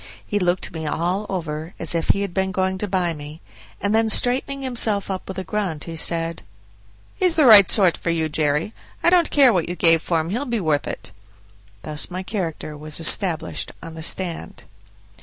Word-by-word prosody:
He 205 - -1
looked 180 -1 -1
me 160 -2 -5
all 180 +7 -2
over, 160 -2 -5
as - - +1
if 165 -1 -2
he 200 - +3
had 195 -3 -5
been 190 +1 0
going 190 0 -1
to 210 - -2
buy 180 -3 0
me; 150 +1 -10 0.4
and 200 +2 -1
then 225 0 +2
straightening 270 +4 0
himself 220 -6 0
up 185 - -5
with 190 - -7
a 190 - -3
grunt, 185 -5 -3
he 165 - -7
said, 165 0 0 0.7
"He's 365 -3 +1
the 310 - +4
right 210 -5 +8
sort 190 -5 +4
for - - -4
you, 165 -1 0
Jerry; 150 +5 0 0.3
I 345 - +4
don't 350 -2 +4
care 270 -5 +5
what 175 -2 0
you 175 - -3
gave 165 -2 +4
for 165 -1 0
him, 160 +2 -4
he'll 245 +7 -2
be 235 -4 -1
worth 155 -5 0
it." - - -7 0.7
Thus 150 -1 -1
my 185 +1 -5
character 170 -7 -4
was 155 +1 -6
established 165 0 +1
on 165 - -8
the 160 - -8
stand. 170 - -2
180 Hz, 200 wpm, -21 LUFS, 160-205 Hz, 0.7 s, right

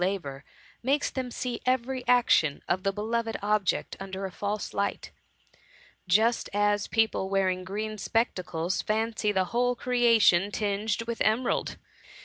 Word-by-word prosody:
labour^ 170 -8 -3 0.4
makes 280 +4 +1
them 260 -2 -3
see 245 0 -4
every 255 0 0
action 240 -12 +3
of 185 - 0
the 195 0 0
beloved 225 +3 -2
object 210 -2 0
under 195 0 -5
a 190 - -5
false 205 +3 -4
light; 200 - -2 1.0
just 220 +6 +2
as 205 0 +2
people 220 -4 +1
wearing 190 -2 +1
green 215 +3 -4
spectacles 185 -5 -1
fancy 220 0 0
the 190 -2 +1
whole 245 +1 +2
creation 230 -7 +4
tinged 210 +2 -1
with 230 0 -5
emerald. 220 +4 +1
210 Hz, 130 wpm, -27 LUFS, 195-235 Hz, 1.0 s, creation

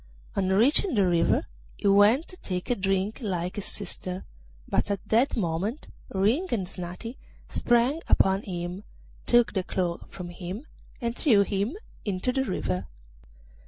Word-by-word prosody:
On 190 -1 +1
reaching 255 - +4
the 200 -3 +4
river 175 -2 +3 0.3
he - - -1
went 205 +9 +5
to 365 - -12
take 180 - -3
a - - +3
drink 195 +1 0
like 180 -4 -2
his 205 - -3
sister, 185 -2 -6 0.4
but - - 0
at 200 -2 -3
that 240 +4 +3
moment 195 - -2 0.2
Ring 220 - +2
and 200 -6 0
Snati 180 +7 -7 0.3
sprang 245 +6 +2
upon 190 +1 +4
him, 180 0 -5 0.4
took 240 -1 +4
the 190 - +1
cloak 180 -2 -2
from 180 -2 -7
him, 180 - -6 0.3
and 235 -2 -2
threw 220 -10 +5
him 205 - -1 0.3
into 200 +3 0
the 265 +1 +1
river. 90 - -2
200 Hz, 150 wpm, -27 LUFS, 185-235 Hz, 0.4 s, went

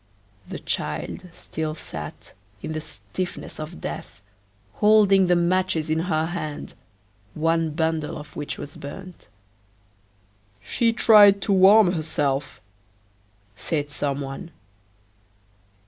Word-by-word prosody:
The - - -5
child 185 - -4
still 155 -2 -5
sat, - - -8 0.3
in - - -4
the 155 - -3
stiffness 180 +3 -6
of 155 +3 -7
death, - - -6 0.6
holding 205 -3 +5
the 175 - +4
matches 170 -2 +1
in 160 - +1
her 160 -2 0
hand, 160 -3 -5 0.6
one 165 +1 +1
bundle 160 0 -1
of 150 0 -11
which 145 - -4
was 145 - -8
burnt. 180 +5 -10 1.3
"She 230 - +1
tried 210 -3 +7
to 200 - +1
warm 195 +1 +7
herself," 145 -5 -1 1.0
said 145 +4 -3
some. 140 +2 -4
165 Hz, 105 wpm, -24 LUFS, 155-185 Hz, 1.3 s, tried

